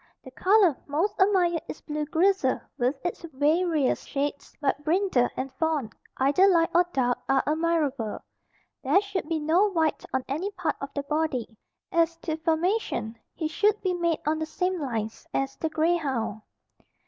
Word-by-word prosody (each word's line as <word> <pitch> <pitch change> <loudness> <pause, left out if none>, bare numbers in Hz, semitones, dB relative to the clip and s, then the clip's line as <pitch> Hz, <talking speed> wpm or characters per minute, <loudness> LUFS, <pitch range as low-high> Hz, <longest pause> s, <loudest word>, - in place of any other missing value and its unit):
The 260 - -11
color 375 +1 +4
most 320 +8 0
admired 360 -4 +3
is - - -7
blue 300 0 -3
grizzle 330 -3 +2 0.2
with 250 +3 +1
its 350 - -3
various 305 +1 +2
shades 285 0 -3
but 285 0 0
brindle 325 -6 +2
and 260 0 -4
fawn, 310 -8 0 0.3
either 285 +9 +4
light 335 -4 +3
or 350 +1 +4
dark 245 -4 +1
are 270 0 +3
admirable. 300 -7 0 0.7
There - - +4
should 395 -5 -4
be 325 - +1
no 335 +7 +3
white 325 -5 0
on 260 -1 0
any 315 +9 -2
part 360 -4 -2
of 275 - -4
the 285 - -1
body. 285 -6 -2 0.4
As 335 0 +2
to 315 - -1
formation, 325 - 0 0.2
he 315 - -2
should 420 +6 +2
be 370 -2 +1
made 340 -2 0
on 310 +1 +1
the 315 - -2
same 360 +2 -1
lines 225 -5 -4
as 270 0 -1
the 320 - -1
grey 325 +3 +2
hound. 260 -8 -3
315 Hz, 165 wpm, -26 LUFS, 275-350 Hz, 0.7 s, color